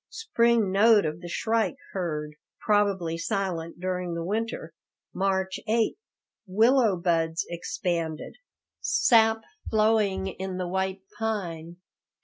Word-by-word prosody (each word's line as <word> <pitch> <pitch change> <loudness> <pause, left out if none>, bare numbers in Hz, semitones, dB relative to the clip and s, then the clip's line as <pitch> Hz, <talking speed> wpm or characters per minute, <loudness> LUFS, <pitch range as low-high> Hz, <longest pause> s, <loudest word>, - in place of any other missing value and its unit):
Spring 235 - +2
note 210 0 +5
of 155 +2 -3
the 175 - -7
shrike 220 0 0 0.2
heard, 150 -5 -3 0.3
probably 195 -6 +1
silent 175 -4 -3
during 180 -1 -2
the 170 - -3
winter. 210 -4 -3 0.4
March 190 0 0
8 225 0 +2 0.5
Willow 225 +2 +4
buds 165 -1 0
expanded. 170 -2 -3 0.5
Sap 225 -1 +3 0.3
flowing 215 -3 +2
in 190 0 -5
the 180 -1 -2
white 190 +1 -2 0.2
pine. 175 -7 -3
190 Hz, 110 wpm, -27 LUFS, 170-220 Hz, 0.5 s, note